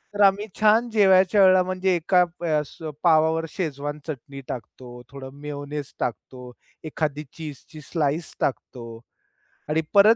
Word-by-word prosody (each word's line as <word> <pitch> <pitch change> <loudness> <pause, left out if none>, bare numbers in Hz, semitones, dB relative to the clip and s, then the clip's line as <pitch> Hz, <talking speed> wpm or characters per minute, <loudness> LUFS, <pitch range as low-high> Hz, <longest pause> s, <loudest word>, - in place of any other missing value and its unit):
तर 205 - 0
आम्ही 200 +1 +4
छान 220 +3 +4
जेवायच्या 195 -2 +5
वेळेला 185 -1 +7
म्हणजे 185 0 0
एका 180 +2 +3
अ, 170 -3 0 0.4
पावावर 160 -1 +4
शेजवान 145 -3 -4
चटणी 140 -2 -7
टाकतो, 125 +1 -8
थोडं 135 -1 -9
मेयोनेज 145 0 -6
टाकतो, 125 +1 -5 0.3
एखादी 150 -1 -2
चीजची 155 0 -9
स्लाइस 155 +1 -2
टाकतो 125 -3 -3 0.8
आणि 155 +1 +2
परत 210 +3 +7
160 Hz, 125 wpm, -24 LUFS, 145-185 Hz, 0.8 s, वेळेला